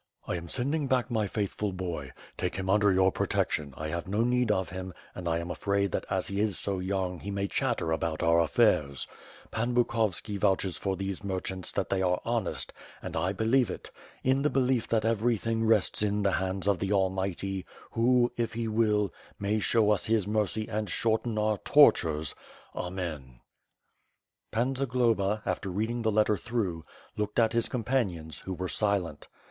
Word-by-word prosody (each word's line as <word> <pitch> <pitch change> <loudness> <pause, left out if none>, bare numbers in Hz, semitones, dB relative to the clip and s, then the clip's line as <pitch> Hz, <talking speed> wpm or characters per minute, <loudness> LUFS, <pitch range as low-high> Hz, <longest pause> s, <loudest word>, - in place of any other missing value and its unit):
I - - -2
am 85 -1 -6
sending 140 +3 -1
back 125 -1 +1
my 110 -3 +1
faithful 105 0 -2
boy. 85 -7 -5 0.2
Take 90 -1 -2
him 95 0 -1
under 105 0 +4
your 95 0 +4
protection; 75 -5 -1
I 75 0 -4
have 85 +3 -3
no 105 +4 +1
need 125 -1 +2
of 95 -3 0
him 95 -1 -6 0.2
and 90 -2 -4
I 80 - +1
am 85 +1 -4
afraid 100 0 0
that - - -2
as - - 0
he 100 0 -3
is 105 -2 +1
so 100 -2 -2
young 95 -1 -2
he 100 - -7
may 100 0 -1
chatter 80 -3 -1
about 80 -1 -1
our 85 0 +4
affairs. 70 -3 +2 0.4
Pan 120 +2 -1
Bukovski 110 -4 0
vouches 95 -2 +1
for 95 -1 -1
those 95 +1 -4
merchants 95 -1 -2
that - - -1
they 95 - +1
are 90 -1 +2
honest, 115 -6 -1 0.3
and - - -5
I 85 +4 +1
believe 115 +5 +2
it. - - -7 0.3
In 130 +1 +3
the 150 - +2
belief 130 -2 +1
that 110 -1 +1
everything 115 0 +1
rests 110 -3 +3
in 105 0 +1
the 100 - +3
hands 95 +1 -1
of 100 -4 +3
the 100 0 -1
Almighty, 95 -1 0 0.3
who, 120 +1 +3
if 115 -1 -1
He 115 0 -2
will, 105 -2 +2 0.2
may 105 +2 0
show 105 0 +3
us 105 - +1
His 110 -2 +2
mercy 110 0 0
and 110 -2 -2
shorten 110 +3 0
our 105 -1 +1
tortures, 80 - +4 0.4
Amen.". 80 -9 -5 1.1
Pan 125 +4 0
Zagloba, 115 -6 +1
after 95 0 -2
reading 110 +6 -1
the 110 -1 +1
letter 105 0 +3
through, 95 -6 -2 0.3
looked 105 0 -3
at 115 -1 +4
his 115 0 +1
companions, 105 - -1
who 95 - -5
were 90 +1 -3
silent. 95 -7 -1
100 Hz, 180 wpm, -29 LUFS, 95-115 Hz, 1.1 s, under